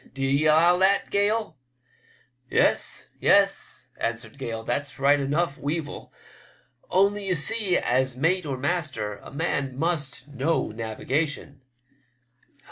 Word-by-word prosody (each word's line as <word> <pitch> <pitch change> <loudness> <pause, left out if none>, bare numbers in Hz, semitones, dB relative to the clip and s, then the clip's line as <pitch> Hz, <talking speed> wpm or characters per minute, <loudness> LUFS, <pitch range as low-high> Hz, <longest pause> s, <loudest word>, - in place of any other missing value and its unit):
D'ye 135 +3 +1
allow 165 +3 +5
that. 195 +1 +2
Gale? 205 - 0 0.4
" - - -32 0.2
"Yes, - - +1
yes," - - +2
answered 115 +3 -4
Gale, 115 -3 -4
"that's 145 +5 -3
right 140 +1 +4
enough. 140 +2 -1
Weevil; 150 +1 -4 0.8
only, 200 +1 +2
you 185 - +2
see, 195 +3 +1
as 130 0 0
mate 165 +4 +1
or 135 -2 -2
master 140 - -2
a - - -13
man 140 -3 -2
must 150 -5 -2
know 140 -1 -1
navigation." 135 +6 -3
145 Hz, 120 wpm, -25 LUFS, 135-175 Hz, 0.8 s, allow